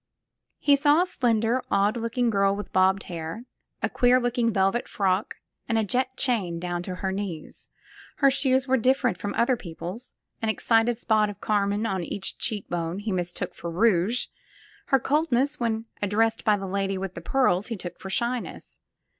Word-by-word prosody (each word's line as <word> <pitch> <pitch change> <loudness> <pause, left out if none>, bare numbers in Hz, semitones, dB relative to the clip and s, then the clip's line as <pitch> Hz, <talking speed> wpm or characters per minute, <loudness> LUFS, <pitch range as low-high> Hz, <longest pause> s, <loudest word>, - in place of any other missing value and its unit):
He 285 - +4
saw 295 +4 +4
a - - -2
slender, 235 -6 +1
odd 200 +3 +2
looking 235 +1 0
girl 195 -1 +2
with 205 - -7
bobbed 190 +1 +3
hair, 170 +6 -6 0.4
a - - +3
queer 250 +1 +3
looking 240 -1 +1
velvet 195 +3 +1
frock 195 0 0 0.3
and 225 - +2
a 220 - +2
jet 255 +4 -1
chain 205 -10 0
down 175 0 -3
to 180 +1 -5
her 190 +1 -2
knees. 190 -5 -6 0.5
Her 275 -1 +4
shoes 265 -1 +2
were 265 0 +3
different 255 +1 +2
from 205 - -4
other 245 +2 +3
people's; 185 +4 -8 0.3
an 225 - 0
excited 225 +1 +2
spot 215 -2 +2
of 205 -1 -8
carmine 205 +1 0
on 190 -4 -1
each 190 +3 -3
cheek 210 -3 -2
bone 170 0 -3
he 205 +1 -3
mistook 180 0 -2
for 170 - -6
rouge; 210 +4 +2 0.6
her 270 - +4
coldness 285 0 +1
when 225 -1 -1 0.2
addressed 215 +3 +1
by 210 -2 +3
the 195 - -5
lady 195 0 -1
with 190 -1 -4
the 170 - -8
pearls 205 -3 +2
he 230 - -4
took 175 -1 -8
for 190 - -7
shyness. 240 +4 -3
215 Hz, 180 wpm, -26 LUFS, 190-245 Hz, 0.6 s, He